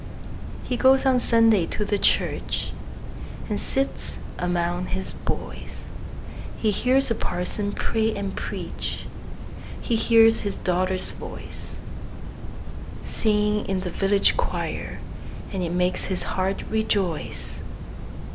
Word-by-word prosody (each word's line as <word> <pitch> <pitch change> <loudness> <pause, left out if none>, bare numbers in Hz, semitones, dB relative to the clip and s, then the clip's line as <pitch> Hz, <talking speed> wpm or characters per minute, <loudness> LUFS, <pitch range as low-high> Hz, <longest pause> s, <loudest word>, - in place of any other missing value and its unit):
He 250 - -2
goes 265 +2 +5
on 260 -1 +4
Sunday 225 -7 +4
to 210 - -1
the 205 0 0
church, - - +1 0.8
And 210 -2 -1
sits 270 +1 -1 0.2
among 175 0 0
his 190 0 -3
boys; - - -5 0.7
He 215 - +2
hears 255 +6 +3
the - - +3
parson 205 0 -2
pray 220 +1 0
and 200 -1 -3
preach, - - -4 0.7
He 235 - 0
hears 225 0 +6
his 200 -1 -3
daughter's 185 +1 +1
voice, - - -9 1.3
Singing 210 -1 +1
in 190 -1 0
the 180 -1 -3
village 195 +2 +3
choir, - - -2 0.6
And 190 - -1
it 170 -2 -1
makes 180 +1 +1
his 190 -2 -1
heart 190 +1 -1
rejoice. 200 -7 -1
205 Hz, 115 wpm, -25 LUFS, 185-225 Hz, 1.3 s, hears